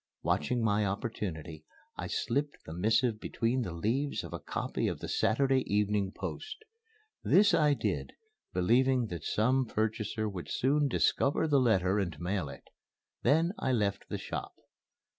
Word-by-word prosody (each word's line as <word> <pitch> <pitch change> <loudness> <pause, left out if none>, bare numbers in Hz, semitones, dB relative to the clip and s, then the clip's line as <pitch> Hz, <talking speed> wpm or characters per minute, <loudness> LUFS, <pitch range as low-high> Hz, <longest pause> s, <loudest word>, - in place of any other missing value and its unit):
Watching 125 -2 +1
my 105 -1 +2
opportunity, 95 -6 -4 0.3
I - - -4
slipped 145 +4 -1
the 80 - -7
missive 110 +5 +2
between 120 +4 -1
the 110 - -3
leaves 120 - -1
of - - -8
a - - -4
copy - - -2
of - - -2
the - - -6
Saturday 135 +3 +2
Evening 105 -1 +1
Post. 435 - -6 0.6
This 205 +1 +5
I 150 -2 +4
did, - - -2 0.4
believing 120 +5 +2
that 85 -4 -6
some 125 +4 +2
purchaser 110 0 -1
would 95 -4 -6
soon 145 +3 +2
discover 140 +3 +2
the 145 -2 +4
letter 100 -5 +3
and 85 -7 -3
mail 90 -3 -2
it. 70 - -10 0.6
Then 160 +7 +3
I 130 - 0
left 100 -4 -1
the - - -2
shop. - - -5
110 Hz, 150 wpm, -31 LUFS, 100-130 Hz, 0.6 s, This